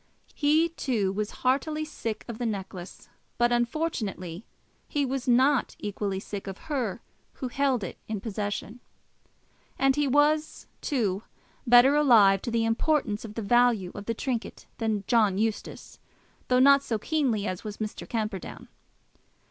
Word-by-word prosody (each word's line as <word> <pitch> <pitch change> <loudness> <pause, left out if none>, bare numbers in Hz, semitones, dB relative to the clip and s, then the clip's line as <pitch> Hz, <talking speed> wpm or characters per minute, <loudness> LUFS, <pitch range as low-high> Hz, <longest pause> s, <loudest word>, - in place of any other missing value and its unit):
He, 310 +3 +3
too, 235 - -1
was 210 +1 -2 0.2
heartily 305 +4 +1
sick 225 -7 -5
of 235 -2 -7
the 245 - -2
necklace; 190 -3 -6 0.3
but 240 0 +3
unfortunately 235 - -2 0.4
he 285 -1 0
was 265 -1 -3
not 260 +2 +3
equally 200 -1 -3
sick 200 0 -7
of 190 -1 -5 0.2
her 235 -5 -2 0.3
who 255 - -5
held 265 -3 +1
it 180 - -6
in 215 -2 -3
possession. 210 +2 -4 1.0
And 270 0 +3
he 295 -1 +1
was, 300 +3 +2 0.2
too, 210 - 0 0.5
better 245 +4 +7
alive 220 -10 +6
to - - -4
the 230 -1 +1
importance 225 -2 0
of 215 -1 -9
the 225 - -3
value 235 -4 +3
of 205 - -8
the 230 - -1
trinket 240 -1 -4
than 220 -3 -1
John 215 -4 +3
Eustace, 220 0 -3 0.5
though 250 - +3
not 280 +2 +6
so 230 -5 -2
keenly 245 -5 0
as 185 -3 -4
was 210 -2 -6
Mr. 215 -1 -6
Camperdown. 215 -5 -4
230 Hz, 150 wpm, -27 LUFS, 205-270 Hz, 1.0 s, better